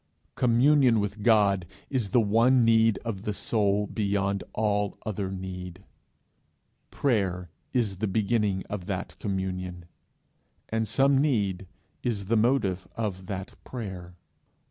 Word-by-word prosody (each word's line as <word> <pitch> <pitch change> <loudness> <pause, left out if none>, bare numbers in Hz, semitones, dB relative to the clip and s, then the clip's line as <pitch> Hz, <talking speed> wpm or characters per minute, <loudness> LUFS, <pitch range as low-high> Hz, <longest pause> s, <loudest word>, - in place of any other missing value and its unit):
Communion 125 0 +4
with 105 +1 -3
God 100 -5 +3 0.2
is 125 -7 -1
the 120 - +4
one 115 +3 +4
need 115 -2 +4
of 105 -5 -3
the 105 0 -3
soul 105 -2 +1
beyond 100 -1 -1
all 105 -2 0
other 100 -3 -2
need; 95 -1 -7 1.1
prayer 95 - 0 0.2
is 110 -7 0
the 110 +3 -1
beginning 105 -1 +1
of 100 -3 -5
that 95 -2 -4
communion, 90 -3 -3 0.8
and 110 0 -1
some 135 +4 +3
need 100 -10 0 0.3
is 105 -5 -2
the 115 +4 +1
motive 110 -6 +1
of 95 -5 -3
that 95 -2 -5
prayer. 95 -7 -7
105 Hz, 120 wpm, -27 LUFS, 95-115 Hz, 1.1 s, Communion